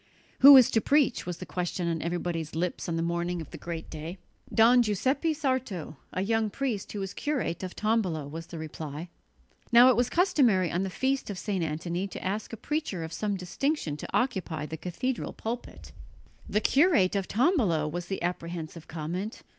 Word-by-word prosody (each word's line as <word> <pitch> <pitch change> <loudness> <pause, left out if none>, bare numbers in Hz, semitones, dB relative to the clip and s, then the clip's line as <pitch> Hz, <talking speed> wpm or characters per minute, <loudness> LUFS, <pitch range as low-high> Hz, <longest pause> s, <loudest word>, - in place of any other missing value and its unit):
"Who 280 +1 +11
is 255 - +6
to 225 - +3
preach?" 280 - +2
was 175 -1 -3
the 185 - -7
question 175 +2 -2
on 165 -1 -1
everybody's 170 -2 -3
lips 175 +1 -2
on 165 - -1
the 165 - 0
morning 170 +1 -1
of 160 - -8
the - - -7
great 165 -1 -5
day. 160 +4 -6 0.3
"Don 240 +2 +6
Giuseppe 260 - +1
Sarto, 260 - -2 0.2
a 185 - -1
young 225 +1 +1
priest 240 -4 -3
who 205 -2 -3
is 195 - -5
curate 280 - -2
of 185 -1 -6
Tombolo," 200 -9 0
was 165 +3 -7
the 170 - -8
reply. 155 +1 -6 0.6
Now 240 +2 +8
it 255 - +5
was 245 0 +2
customary 250 - +3
on 175 - 0
the 195 - -1
feast 265 +7 -1
of 200 - -4
St. 195 -3 -2
Antony 170 +4 -2
to 195 - -8
ask 205 +3 -2
a 225 - -6
preacher 265 - -3
of 160 0 -6
some 205 0 -1
distinction 185 - -2
to - - -7
occupy 185 - -1
the 160 - -5
cathedral 230 +10 -3
pulpit. 235 +2 -6 0.6
"The 210 - +1
curate 270 - +4
of 195 -1 -1
Tombolo!" 220 - +2
was 175 +3 -4
the 195 - -4
apprehensive 170 -2 -4
comment. 175 +7 -5
185 Hz, 185 wpm, -28 LUFS, 170-240 Hz, 0.6 s, Who